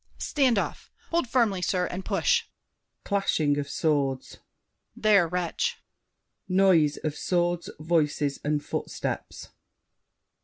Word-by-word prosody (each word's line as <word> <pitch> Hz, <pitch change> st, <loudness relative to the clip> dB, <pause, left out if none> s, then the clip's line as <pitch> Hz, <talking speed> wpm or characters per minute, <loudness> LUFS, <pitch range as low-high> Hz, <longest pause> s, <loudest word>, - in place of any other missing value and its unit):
Stand 265 Hz, -7 st, +2 dB
off! -, -, -3 dB, 0.2 s
Hold 340 Hz, -5 st, +1 dB
firmly, 225 Hz, -8 st, +2 dB
sir, 180 Hz, 0 st, +1 dB
and 180 Hz, +2 st, -5 dB
push! 475 Hz, -, +1 dB, 0.6 s
[Clashing 160 Hz, -8 st, +1 dB
of 140 Hz, -1 st, -4 dB
swords. 140 Hz, -5 st, -1 dB, 0.6 s
There, 205 Hz, -5 st, +4 dB
wretch! 180 Hz, -, -1 dB, 0.7 s
[Noise 185 Hz, -6 st, +4 dB
of 155 Hz, -, -1 dB
swords, 175 Hz, -1 st, 0 dB
voices, 150 Hz, -3 st, 0 dB
and 150 Hz, 0 st, -1 dB
footsteps. -, -, -4 dB
175 Hz, 105 wpm, -27 LUFS, 150-200 Hz, 0.7 s, There